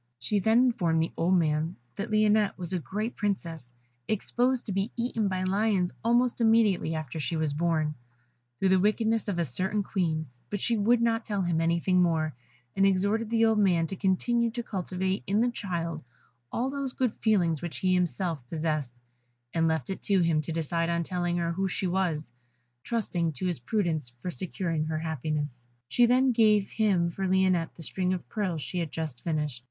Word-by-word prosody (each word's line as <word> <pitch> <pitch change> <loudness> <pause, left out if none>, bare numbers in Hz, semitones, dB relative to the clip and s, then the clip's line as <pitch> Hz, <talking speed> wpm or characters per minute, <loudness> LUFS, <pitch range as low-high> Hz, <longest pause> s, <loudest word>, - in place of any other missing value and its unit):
She 130 - 0
then 220 +4 +3
informed 175 -10 +1
the 165 - -3
old 180 +3 +2
man 160 0 +1 0.2
that 205 +3 -4
Lionette 215 -1 +3
was 180 -1 -3
a 180 - +1
great 210 - -4
Princess, 170 - -3 0.4
exposed 245 +4 0
to 210 - -3
be 195 +4 -1
eaten 235 -3 0
by 185 -1 -1
lions 195 -1 +1
almost 240 +1 +2
immediately 220 -7 +3
after 155 0 -5
she 160 +2 -2
was 155 -2 0
born, 155 -1 0 0.6
through 190 - +2
the 190 0 +5
wickedness 220 +3 +1
of 200 -4 -1
a 170 - +1
certain 190 - 0
Queen; 165 -6 -1 0.2
but 205 - -2
she 235 +4 +1
would 230 +3 +3
not 230 -1 +1
tell 205 -3 -1
him 170 -2 +1
anything 170 +2 +2
more, 160 -3 +1 0.4
and 195 0 +4
exhorted 200 +4 +1
the 230 0 +3
old 220 -1 +3
man 180 -5 +3
to 180 - -5
continue 230 +5 +1
to 240 +1 -4
cultivate 190 -1 -2
in 200 +3 +2
the 240 +1 +2
child 170 -7 -3 0.5
all 255 +3 -1
those 275 -2 -3
good 250 -4 0
feelings 175 -8 +2
which 165 -7 -5
he 185 +5 +1
himself 180 -2 0
possessed, 155 -6 -2 0.6
and 165 0 +2
left 160 -1 -1
it 190 - -5
to 195 -2 +2
him 165 -2 +2
to 155 - -5
decide 165 +1 -1
on 170 0 0
telling 175 0 -1
her 170 -1 0
who 190 +3 -1
she 190 - -2
was, 175 -7 -1 0.5
trusting 180 -8 -1
to 145 - -4
his 175 -6 -1
prudence 160 - -1
for 120 +9 -7
securing 170 -3 -2
her 155 0 -2
happiness. 150 -5 -3 0.2
She 240 -1 +4
then 255 +2 +4
gave 215 -4 +3
him 190 -6 +2
for 190 +3 -2
Lionette 185 -3 +2
the 165 - -9
string 185 +2 0
of 180 - -5
pearls 185 -8 -2
she 180 - -3
had 165 -2 -2
just 155 -7 -5
finished. 150 -6 -2
185 Hz, 190 wpm, -28 LUFS, 165-210 Hz, 0.6 s, the